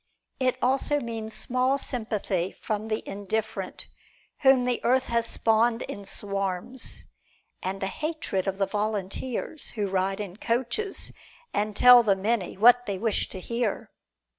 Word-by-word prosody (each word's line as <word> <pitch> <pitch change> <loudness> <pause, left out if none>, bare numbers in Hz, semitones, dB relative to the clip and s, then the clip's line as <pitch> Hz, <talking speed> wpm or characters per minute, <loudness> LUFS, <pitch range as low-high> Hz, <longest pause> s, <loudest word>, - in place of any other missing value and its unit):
It 255 -1 +1
also 270 +3 +2
means 225 -3 -5
small 255 +2 +1
sympathy 215 -8 -2
from 215 0 -3
the 220 0 -3
indifferent 205 +2 -3 0.5
whom 265 -2 +5
the 250 -1 0
earth 255 +2 +3
has 235 -2 0
spawned 230 +1 +2
in 200 - -7
swarms, 195 +4 0 0.6
and 190 +1 -3
the 195 - -2
hatred 300 - -3
of 195 0 -1
the 195 - +2
volunteers 215 +7 -2
who 205 -1 0
ride 195 +1 0
in 200 -2 -6
coaches, 250 - -2 0.4
and 210 0 -1
tell 250 +1 +9
the 205 -4 +3
many 200 -1 -1
what 245 +3 +6
they 200 -2 -2
wish 220 +1 0
to 190 - -7
hear. 235 +2 -2
220 Hz, 140 wpm, -27 LUFS, 195-245 Hz, 0.6 s, tell